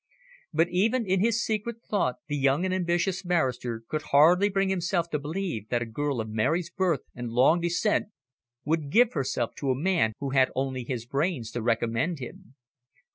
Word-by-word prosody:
But 165 +1 +2
even 220 +7 +1
in 190 0 +1
his 230 +3 +1
secret 225 +2 -3
thought 175 -12 0
the 145 - -2
young 140 +4 +2
and 185 - 0
ambitious 180 +1 0
barrister 130 -10 -1
could 155 +3 -2
hardly 170 +8 +5
bring 195 -1 +1
himself 175 -2 -1
to 150 - 0
believe 155 - -4
that 120 -1 0
a - - -6
girl 140 +3 -2
of 110 - -3
Mary's 155 +11 0
birth 175 -7 0
and 120 -1 -5
long 130 +9 +4
descent 175 +5 +1 0.6
would 155 -1 0
give 240 +8 +4
herself 130 -5 -1
to 140 - -2
a 130 - +2
man 170 -10 +2
who 140 -1 -4
had 130 -1 +4
only 130 -1 -2
his 120 -2 -4
brains 140 -3 -2
to 120 - -4
recommend 115 +8 0
him. 125 -1 -10
155 Hz, 185 wpm, -27 LUFS, 130-185 Hz, 0.6 s, hardly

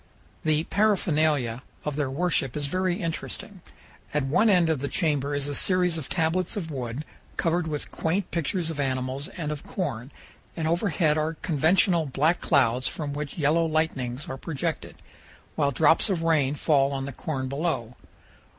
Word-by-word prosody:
The 155 0 +2
paraphernalia 155 - +1 0.2
of 150 -2 -2
their 145 -2 0
worship 140 -2 0
is 145 - -1
very 185 +4 0
interesting. 175 +3 -5 0.5
At 150 - +2
one 170 +12 +3
end 180 -4 +5
of 160 -4 +1
the 140 - -2
chamber 145 -4 0
is 145 0 -2
a 145 - -3
series 180 +2 +2
of 140 - -8
tablets 175 +5 0
of 165 -5 -4
wood 130 +1 -4 0.3
covered 170 0 +1
with 150 -2 -4
quaint 180 +4 -1
pictures 170 +1 -1
of 150 - -6
animals 130 +1 -1
and 150 -4 -5
of 150 -1 -5
corn, 135 - -4 0.5
and 160 -1 -1
overhead 165 -3 +2
are 160 +2 -1
conventional 165 +1 +3
black 150 +6 +1
clouds 130 -1 +2
from 145 -3 -4
which 145 -1 -5
yellow 165 +2 +3
lightnings 150 -5 -1
are 130 - -5
projected, 160 +2 -3 0.6
while 140 - +2
drops 160 - +4
of 175 -4 0
rain 150 -4 +2
fall 140 -2 +2
on 135 -1 -2
the 140 - -6
corn 130 -1 -3
below. 140 -4 -2
155 Hz, 165 wpm, -26 LUFS, 140-170 Hz, 0.6 s, end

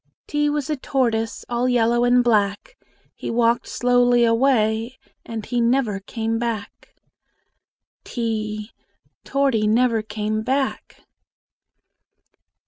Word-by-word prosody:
T 295 0 0
was 295 -2 -2
a 305 - -1
tortoise, 235 -5 -1
All 240 +1 0
yellow 240 0 +2
and 245 0 +4
black: 210 - 0 0.4
He - - -7
walked 235 0 +1
slowly 245 -1 +3
away, 230 0 +1 0.3
And 225 -2 -6
he 245 -1 -1
never 235 -4 +1
came 225 +3 -3
back. 230 -4 -5 1.1
t 215 -2 -3 0.5
Torty 265 -7 +1
never 230 0 +2
came 215 0 -3
back! 265 +4 -2
235 Hz, 105 wpm, -22 LUFS, 220-250 Hz, 1.1 s, and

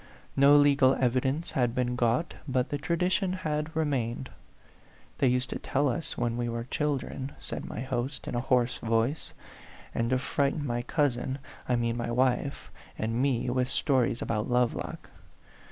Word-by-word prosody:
No 140 +2 +7
legal 140 -2 +5
evidence 130 +5 0
had 120 -2 +1
been 125 -1 0
got, 125 +7 +1
but 130 -1 0
the 145 - -2
tradition 180 +4 +1
had 155 -3 -2
remained. 130 -5 -1 0.9
"They 135 - +4
used 125 +1 +1
to - - -3
tell 140 0 +1
it - - -1
us 165 - -7
when 120 0 0
we 120 -1 -1
were 115 0 -3
children," 140 0 -2
said - - -5
my 110 - -5
host, 130 +1 -3
in - - -3
a 120 - 0
hoarse 125 0 +1
voice, 115 +6 0 0.3
" - - -19
and 115 0 0
to 130 - +3
frighten 140 +3 0
my 120 -2 -1
cousin 130 -1 0 0.3
I 125 - +4
mean 115 0 0
my 120 0 -2
wife 125 - 0 0.3
and 115 +3 -1
me 130 -3 +1
with 125 0 +1
stories 130 -4 +1
about 105 0 -1
Lovelock. 125 -1 -1
130 Hz, 170 wpm, -29 LUFS, 120-145 Hz, 0.9 s, No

